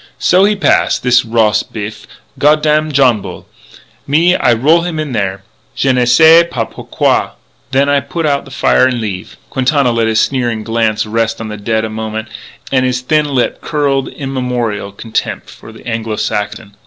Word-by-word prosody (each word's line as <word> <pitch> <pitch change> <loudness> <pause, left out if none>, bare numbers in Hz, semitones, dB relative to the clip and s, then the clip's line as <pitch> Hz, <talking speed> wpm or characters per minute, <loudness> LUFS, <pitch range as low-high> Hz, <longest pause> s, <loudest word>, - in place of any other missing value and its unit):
" - - -40
So 185 +2 +5
he 210 +1 +2
pass, 200 - +2
this 125 -1 +2
ros 110 -2 +2
biff 105 0 -8 0.3
goddam 155 +1 +2
Johnbull.... 120 -10 +1 0.6
Me, 165 +5 +3
I 120 - +2
roll 145 +9 +3
him 170 -2 -4
in 155 -3 -3
there.... 100 -4 -2 0.3
Je 135 -1 +1
ne 125 -1 +2
sais 160 +6 +6
pas 120 -8 -2
pourquoi.... - - -1 0.4
Then 135 +1 +2
I 145 0 +3
put 165 +3 -4
out 140 -2 0
the - - -12
fire 130 0 +2
and 125 -2 -2
leave." 100 -5 -6
Quintana 135 -1 +1
let 115 -1 0
his 110 0 +1
sneering 120 -5 -1
glance 115 -1 0
rest 115 +1 -1
on 110 -1 -6
the 105 - -5
dead 110 +1 -1
a - - -5
moment, 110 0 -5 0.4
and 130 -1 +2
his 125 0 -1
thin 150 +4 +1
lip 135 -4 -1
curled 140 -3 -1
immemorial 125 -7 -3
contempt 110 +3 -4
for 110 - -13
the 110 - -14
Anglo 115 -1 -3
Saxon. 105 0 -4
120 Hz, 180 wpm, -14 LUFS, 110-140 Hz, 0.6 s, sais